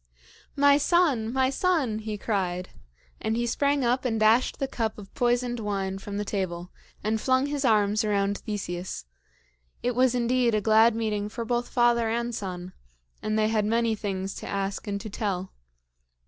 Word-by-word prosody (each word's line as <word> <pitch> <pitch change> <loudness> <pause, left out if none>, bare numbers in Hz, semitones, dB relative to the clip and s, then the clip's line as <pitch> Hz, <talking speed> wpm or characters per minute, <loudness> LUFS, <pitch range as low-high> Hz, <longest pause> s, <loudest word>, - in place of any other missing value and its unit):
"My 285 0 +5
son! 290 -9 +2
my 260 +1 +2
son!" 275 - +1
he 215 -1 -4
cried; 185 -4 -2 0.5
and 220 +1 -1
he 240 - 0
sprang 280 +3 +1
up 250 +2 +1
and 225 -4 0
dashed 220 +4 +3
the 275 - -1
cup 225 -4 -2
of 200 -2 -11
poisoned 245 0 +1
wine 195 -2 -2
from 200 +1 -6
the 210 - -2
table, 180 -3 -3 0.3
and 215 +1 0
flung 260 +1 +2
his 290 -1 -2
arms 210 -3 +3
around 200 -1 0
Theseus. 185 - -5 0.8
It 245 - +1
was 250 0 +3
indeed 245 -1 +2
a - - +3
glad 220 +2 +5
meeting 210 -2 -1
for 230 +2 -5
both 240 +1 -1
father 240 -2 +3
and 235 +1 -1
son, 185 -3 -5 0.5
and 215 0 -1
they 215 0 +2
had 220 -1 +1
many 230 +1 +1
things 195 -2 -3
to - - -7
ask 195 +2 -3
and 200 -1 -2
to 215 - -6
tell. 190 -3 -3
220 Hz, 175 wpm, -26 LUFS, 200-245 Hz, 0.8 s, My